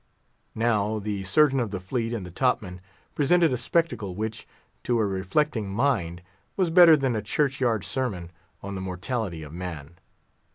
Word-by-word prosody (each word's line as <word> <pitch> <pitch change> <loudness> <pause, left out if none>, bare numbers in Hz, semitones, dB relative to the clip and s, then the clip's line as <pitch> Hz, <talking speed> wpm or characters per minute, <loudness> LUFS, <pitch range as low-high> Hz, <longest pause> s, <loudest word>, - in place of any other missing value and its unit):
Now 110 -2 +1
the 105 -2 -3
Surgeon 135 +7 +4
of 115 -4 -1
the 95 -1 -4
Fleet 115 +5 -3
and 115 -6 -4
the 90 - -9
top 125 +7 +2
man 90 -2 -9 0.3
presented 165 +1 +3
a - - +2
spectacle 120 - -1
which, 110 +2 -4 0.3
to 120 -1 0
a 110 - +2
reflecting 100 +4 -1
mind, 95 -7 0 0.3
was 185 -4 +1
better 170 -2 +8
than 135 -4 0
a 110 - -1
church 135 +5 -1
yard 115 -6 +1
sermon 95 -6 -3 0.3
on 100 0 -5
the 95 - -4
mortality 95 -1 -4
of 75 0 -10
man. 85 -2 -7
110 Hz, 170 wpm, -26 LUFS, 95-130 Hz, 0.3 s, better